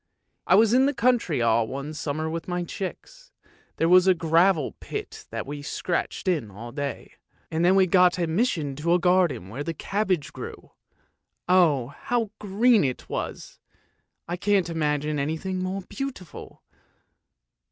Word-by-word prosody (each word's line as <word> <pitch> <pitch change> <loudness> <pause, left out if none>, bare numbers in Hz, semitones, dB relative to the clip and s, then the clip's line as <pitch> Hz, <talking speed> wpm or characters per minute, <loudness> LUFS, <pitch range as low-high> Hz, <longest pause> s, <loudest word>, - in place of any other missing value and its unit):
" - - -40
I 180 - +6
was 220 +2 +5
in 260 +2 +5
the 285 - -1
country 235 - +1
all 115 0 +3
one 140 +5 -5
summer 155 +1 -3
with 165 +1 -4
my 180 -1 -2
chicks; - - -7 0.4
there 165 - +1
was 180 +1 +6
a 185 - +6
gravel 165 -1 +2
pit - - -7
that - - -4
we 145 +1 -6
scratched 170 +6 -3
in 155 - 0
all 115 +5 -9
day, 140 +1 -5 0.4
and 160 +1 0
then 180 +2 +5
we 190 -1 +5
got 180 0 +5
admis 175 +7 +1
sion 145 -6 -3
to 170 +4 +2
a - - +2
garden 180 - +2
where 130 +8 -5
the 165 +2 -4
cabbage 190 -6 -1
grew! - - -9 0.8
Oh, 160 -9 +3
how 225 +8 -2
green 215 +2 +3
it 130 -3 -3
was! - - -5 0.7
I 175 +1 -3
can't 195 -2 +1
imagine 150 -2 -1
anything 160 +6 -2
more 185 +1 -3
beautiful." 250 - -8
175 Hz, 160 wpm, -25 LUFS, 150-190 Hz, 0.8 s, I